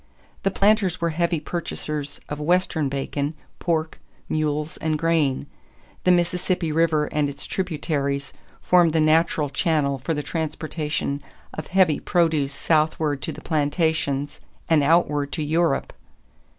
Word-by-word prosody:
The 195 Hz, -, +2 dB
planters 195 Hz, -2 st, +2 dB
were 170 Hz, -1 st, 0 dB
heavy 170 Hz, 0 st, 0 dB
purchasers 150 Hz, -3 st, -4 dB
of 150 Hz, -, -5 dB
Western 160 Hz, -2 st, +1 dB
bacon, 140 Hz, +2 st, -2 dB, 0.2 s
pork, 160 Hz, -2 st, -1 dB, 0.3 s
mules, 150 Hz, 0 st, -1 dB
and 155 Hz, -1 st, -1 dB
grain. 155 Hz, -5 st, +1 dB, 0.6 s
The 180 Hz, -, +6 dB
Mississippi 175 Hz, -1 st, +1 dB
River 160 Hz, -1 st, +2 dB
and 150 Hz, -1 st, 0 dB
its 140 Hz, 0 st, -7 dB
tributaries 145 Hz, -6 st, -2 dB, 0.3 s
formed 175 Hz, -3 st, +4 dB
the 160 Hz, -, +3 dB
natural 155 Hz, -1 st, +3 dB
channel 140 Hz, -2 st, +1 dB
for 160 Hz, +6 st, -2 dB
the 150 Hz, -, -2 dB
transportation 155 Hz, -2 st, -3 dB, 0.3 s
of 155 Hz, -, -6 dB
heavy 180 Hz, -5 st, +3 dB
produce 160 Hz, -5 st, +1 dB
southward 155 Hz, -1 st, +1 dB
to -, -, -3 dB
the -, -, -9 dB
plantations 145 Hz, -2 st, 0 dB, 0.3 s
and 160 Hz, -2 st, +4 dB
outward 145 Hz, -2 st, +2 dB
to 155 Hz, -, -1 dB
Europe. 160 Hz, -1 st, +1 dB
155 Hz, 130 wpm, -23 LUFS, 145-170 Hz, 0.6 s, The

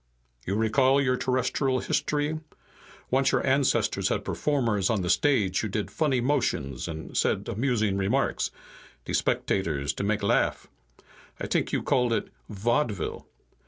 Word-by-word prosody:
"You 95 Hz, -, 0 dB
recall 130 Hz, +5 st, +3 dB
your 125 Hz, -2 st, +2 dB
terrestrial 130 Hz, +1 st, 0 dB
history? 150 Hz, +4 st, -1 dB, 0.7 s
Once 135 Hz, +1 st, +3 dB
your -, -, +1 dB
ancestors 135 Hz, 0 st, +2 dB
had -, -, -1 dB
performers 115 Hz, -10 st, 0 dB
on 110 Hz, -5 st, 0 dB
the 90 Hz, -, +1 dB
stage 110 Hz, -11 st, +2 dB
who 110 Hz, -, -2 dB
did 105 Hz, +1 st, -3 dB
funny 145 Hz, -5 st, +1 dB
motions 120 Hz, -, -1 dB
and 80 Hz, -1 st, -7 dB
said -, -, +1 dB
amusing 110 Hz, -4 st, 0 dB
remarks, 105 Hz, +8 st, 0 dB, 0.6 s
de -, -, -4 dB
spectators 75 Hz, -8 st, 0 dB
to 100 Hz, -, -4 dB
make 105 Hz, +1 st, 0 dB
laugh. 100 Hz, -, +1 dB, 0.7 s
I -, -, -3 dB
t'ink -, -, 0 dB
you -, -, -1 dB
called 125 Hz, -2 st, +2 dB
it -, -, -1 dB, 0.2 s
'vaudeville.' 115 Hz, +1 st, -1 dB
120 Hz, 140 wpm, -27 LUFS, 100-135 Hz, 0.7 s, recall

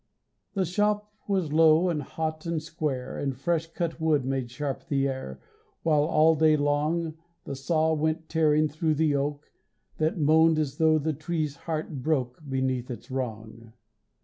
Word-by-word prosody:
The 190 Hz, -2 st, +1 dB
shop 210 Hz, +3 st, 0 dB, 0.2 s
was 185 Hz, -7 st, 0 dB
low 160 Hz, +2 st, +5 dB
and 155 Hz, -4 st, -1 dB
hot 155 Hz, +2 st, -4 dB
and 165 Hz, -1 st, 0 dB
square, 150 Hz, -5 st, -4 dB
And 135 Hz, -3 st, -2 dB
fresh 165 Hz, +3 st, 0 dB
cut 165 Hz, -1 st, -3 dB
wood 155 Hz, -4 st, +2 dB
made 135 Hz, -2 st, -2 dB
sharp 140 Hz, +4 st, -4 dB
the 140 Hz, -3 st, +1 dB
air, 130 Hz, -, -5 dB, 0.4 s
While 150 Hz, -2 st, +3 dB
all 160 Hz, +1 st, +4 dB
day 155 Hz, 0 st, +4 dB
long 155 Hz, +3 st, 0 dB, 0.2 s
The 140 Hz, -, -5 dB
saw 160 Hz, +3 st, +1 dB
went 160 Hz, +1 st, -1 dB
tearing 155 Hz, -1 st, +3 dB
thru 155 Hz, +1 st, 0 dB
the 155 Hz, -1 st, +2 dB
oak 145 Hz, +1 st, -3 dB, 0.5 s
That 155 Hz, +2 st, 0 dB
moaned 160 Hz, +1 st, +4 dB
as 145 Hz, -2 st, -1 dB
tho' 160 Hz, -1 st, +4 dB
the 155 Hz, +1 st, -1 dB
tree's 155 Hz, -1 st, -3 dB
heart 155 Hz, -4 st, -4 dB
broke 130 Hz, -2 st, -1 dB
Beneath 130 Hz, -1 st, -1 dB
its 120 Hz, 0 st, -8 dB
wrong. 115 Hz, -3 st, -5 dB
155 Hz, 160 wpm, -27 LUFS, 135-160 Hz, 0.5 s, low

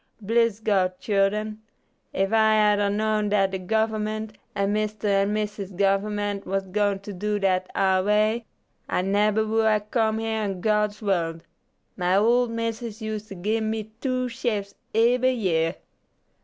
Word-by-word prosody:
Bliss 225 Hz, 0 st, +1 dB
God, 190 Hz, -4 st, +1 dB
childen, 210 Hz, +1 st, 0 dB, 0.5 s
if 195 Hz, +2 st, 0 dB
I 220 Hz, -1 st, +5 dB
had 210 Hz, -1 st, +4 dB
ar 205 Hz, 0 st, +2 dB
know 215 Hz, +1 st, +1 dB
dat 205 Hz, -2 st, +2 dB
de 190 Hz, -, -3 dB
Government, 215 Hz, +1 st, -1 dB, 0.2 s
and 200 Hz, +1 st, 0 dB
Mister 215 Hz, 0 st, -2 dB
and 200 Hz, 0 st, +2 dB
Missus 210 Hz, -2 st, -3 dB
Government, 200 Hz, +1 st, 0 dB
was 195 Hz, 0 st, -1 dB
going 200 Hz, 0 st, 0 dB
to 205 Hz, +1 st, -7 dB
do 210 Hz, +3 st, -1 dB
dat 185 Hz, -2 st, 0 dB
ar 190 Hz, -1 st, +2 dB
way, 215 Hz, +3 st, +1 dB, 0.4 s
I 180 Hz, -, 0 dB
neber 210 Hz, +2 st, +2 dB
would 220 Hz, 0 st, +1 dB
'ave 210 Hz, -1 st, +2 dB
comed 220 Hz, -2 st, +1 dB
here 220 Hz, -1 st, -1 dB
in 195 Hz, -3 st, -3 dB
God's 210 Hz, +1 st, 0 dB
wurld. 165 Hz, -4 st, -1 dB, 0.5 s
My 180 Hz, 0 st, +1 dB
old 240 Hz, +3 st, +3 dB
missus 230 Hz, -1 st, -4 dB
us't 215 Hz, -4 st, -6 dB
gib 220 Hz, +2 st, +1 dB
me 220 Hz, 0 st, -3 dB
two 255 Hz, -2 st, 0 dB
shifes 230 Hz, -5 st, -3 dB, 0.2 s
eber 245 Hz, +3 st, +4 dB
year." 180 Hz, -9 st, 0 dB
210 Hz, 155 wpm, -25 LUFS, 195-220 Hz, 0.5 s, I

